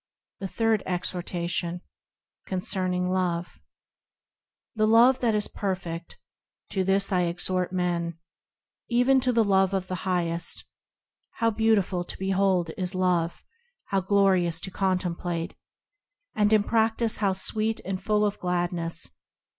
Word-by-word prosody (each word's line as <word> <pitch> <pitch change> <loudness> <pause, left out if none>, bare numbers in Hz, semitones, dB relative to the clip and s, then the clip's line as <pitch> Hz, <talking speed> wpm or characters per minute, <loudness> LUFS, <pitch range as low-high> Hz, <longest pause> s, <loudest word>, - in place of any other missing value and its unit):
The 195 - -3
Third 225 +1 +1
Exhortation, 175 -1 -3 0.7
concerning 185 -1 -1
Love 175 -2 -2 1.1
THE 215 -1 +2
Love 235 +4 +6
that 230 -3 +2
is 210 - +1
perfect, 180 -4 -4 0.5
To 190 - 0
this 195 +2 +1
I 180 -2 +2
exhort 180 +1 0
men; 175 -2 -1 0.7
Even 250 +2 +4
to 255 0 +2
the 230 -2 +3
Love 195 -1 +3
of 185 -1 -3
the 185 -2 -3
Highest. 170 -2 0 0.7
How 230 0 +1
beautiful 210 -5 +2
to - - -8
behold 190 -3 +1
is 185 0 -2
Love! 180 -2 0 0.5
How 195 -1 +1
glorious 185 -4 +2
to 190 - -5
contemplate! 180 -2 -1 0.8
And 210 0 +2
in 215 -2 +5
practice 225 +1 +1
how 200 -3 +1
sweet 215 +3 0
and 190 0 -3
full 210 +1 +2
of 205 0 -2
gladness! 175 -2 -1
185 Hz, 125 wpm, -26 LUFS, 175-210 Hz, 1.1 s, Love